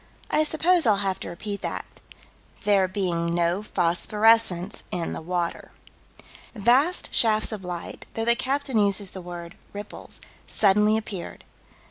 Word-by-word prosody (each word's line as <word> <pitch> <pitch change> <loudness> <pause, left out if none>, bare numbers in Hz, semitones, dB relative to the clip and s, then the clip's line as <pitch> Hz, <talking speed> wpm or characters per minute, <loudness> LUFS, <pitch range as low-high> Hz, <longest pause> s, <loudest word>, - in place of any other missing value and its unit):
I - - +3
suppose 320 +1 +4
I'll 210 - +5
have 190 -1 -1
to - - -6
repeat 200 +3 -5
that: - - -4 0.4
"... - - -28
there 200 -2 +4
being 175 -3 -1
no 175 +3 +1
phosphorescence 210 +1 +2
in 170 -2 -3
the - - -5
water." 175 0 -3 0.9
Vast 255 - +3
shafts 215 -1 +3
of 210 -3 -6
light 175 -1 -7
though 225 - -1
the 235 0 +4
captain 270 -2 -1
uses 200 -1 +1
the 190 - -8
word 175 0 -8 0.2
"ripples" 205 0 -5 0.3
suddenly 210 +1 +3
appeared. 200 -5 -7
205 Hz, 140 wpm, -25 LUFS, 180-225 Hz, 0.9 s, I'll